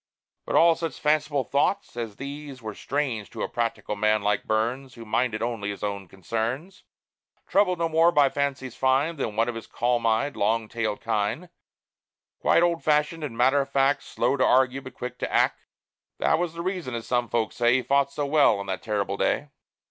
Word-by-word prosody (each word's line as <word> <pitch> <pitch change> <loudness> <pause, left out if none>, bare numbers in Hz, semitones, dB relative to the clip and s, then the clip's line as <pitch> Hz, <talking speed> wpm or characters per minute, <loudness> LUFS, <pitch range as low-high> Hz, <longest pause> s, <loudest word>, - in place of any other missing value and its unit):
But - - -1
all 170 0 +6
such 165 -3 -5
fanciful 150 -2 +1
thoughts 145 +9 0
as 115 -4 -5
these 140 0 -7
Were 110 -3 -6
strange 130 -5 -3
to - - -5
a - - -1
practical 115 -2 -2
man 105 0 +2
like 105 0 0
Burns, 120 +4 -1
Who 115 -1 -10
minded 110 0 0
only 115 -4 -2
his 100 - -6
own 100 -2 -3
concerns, 115 - -4 0.6
Troubled 190 -3 +2
no 165 0 0
more 165 +1 +4
by 145 -3 +5
fancies 135 -3 -2
fine 135 +5 +1
Than 110 -6 -3
one 115 +2 +2
of 120 - -2
his 115 -1 -8
calm 120 -1 0
eyed, 115 +5 +1
long 110 +2 +1
tailed 110 -2 -3
kine, 115 - -1 0.9
Quite 170 - +4
old 170 -1 +1
fashioned 150 +1 +1
and 125 -6 -5
matter 135 +4 +4
of 135 - -5
fact, 140 +1 +2
Slow - - 0
to 130 - +2
argue, 130 +1 +3
but 130 - -11
quick 125 0 -6
to - - -3
act. - - +1 0.5
That - - +2
was 170 -2 -2
the 170 - -4
reason, 180 -9 -3
as 115 - -5
some 120 -2 0
folks 115 -2 -1
say, 120 0 +4
He 130 - +2
fought 140 +1 +2
so 145 +1 -2
well 140 -7 +4
on 100 - -5
that 95 -2 -4
terrible 100 -2 -2
day. 145 +7 0
130 Hz, 200 wpm, -25 LUFS, 110-145 Hz, 0.9 s, all